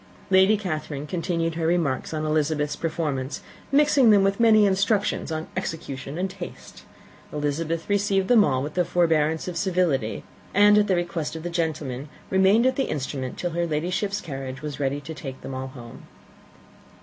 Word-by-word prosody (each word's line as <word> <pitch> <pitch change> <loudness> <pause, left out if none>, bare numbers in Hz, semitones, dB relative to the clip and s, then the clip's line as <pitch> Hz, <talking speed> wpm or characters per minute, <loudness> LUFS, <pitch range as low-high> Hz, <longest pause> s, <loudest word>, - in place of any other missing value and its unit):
Lady 190 +3 +5
Catherine 155 -7 -4
continued 165 0 -1
her 160 0 -1
remarks 165 -6 0
on 155 -1 -2
Elizabeth's 155 -1 0
performance, 150 -5 -3 0.3
mixing 280 -3 +5
with 195 0 +1
them - - -2
many 215 -2 +6
instructions 195 -1 +1
on 160 0 -3
execution 140 -2 -5
and 185 +2 0
taste. 185 -2 -10 0.5
Elizabeth 155 +3 -2
received 200 -1 +1
them 240 -3 +6
with - - +5
all 130 -1 0
the 155 +5 0
forbearance 160 -2 +1
of 180 - -4
civility; 175 - 0 0.3
and 205 +1 +7
at 210 - +2
the 190 - +2
request 170 -3 -2
of 160 - -6
the 175 - -4
gentlemen 155 -5 -3 0.2
remained 195 +5 +4
at 260 - +2
the 270 - 0
instrument 130 -2 -4
till 175 - -2
her 170 +1 -1
Ladyship's 180 +6 -1
carriage 135 -4 -6
was 150 -2 -5
ready 140 0 -1
to 150 +3 -8
take 135 -4 -8
them 135 - -7
all 130 0 -4
home. 120 -3 -12
165 Hz, 170 wpm, -24 LUFS, 145-190 Hz, 0.5 s, and